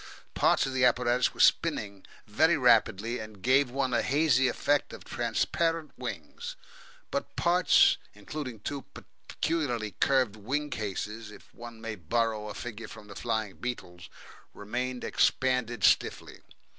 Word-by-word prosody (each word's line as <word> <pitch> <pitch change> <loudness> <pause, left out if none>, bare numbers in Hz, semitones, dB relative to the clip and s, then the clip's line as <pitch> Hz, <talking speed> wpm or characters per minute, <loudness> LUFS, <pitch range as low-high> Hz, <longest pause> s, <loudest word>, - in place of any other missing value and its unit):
Parts - - +3
of 135 - -4
the 130 -1 +1
apparatus 125 0 +3
were - - -17
spinning 100 -2 +2 0.2
very 160 +11 +3
rapidly, 115 -2 +3
and 110 -3 -10
gave 130 +1 +4
one 130 0 -1
a - - +3
hazy 135 -2 +3
effect 145 +3 0
of - - -10
transparent 165 -2 -1
wings; 480 +1 -6 0.6
but - - -3
parts, 175 +1 +4 0.2
including 120 +2 -7
two 140 +3 -4 0.4
peculiarly 125 -10 -1
curved 130 -6 +2
"wing 140 +8 -3
cases" 105 +1 -4
if 105 - -15
one 120 -1 -10
may 115 -1 -4
borrow 110 +4 -1
a 105 - -7
figure 115 -2 -7
from 110 -2 -12
the 100 - -10
flying 110 -4 -2
beetles 90 -8 -6 0.5
remained 125 +4 -4
expanded 125 -4 +1
stiffly. - - +2
120 Hz, 135 wpm, -29 LUFS, 110-135 Hz, 0.6 s, gave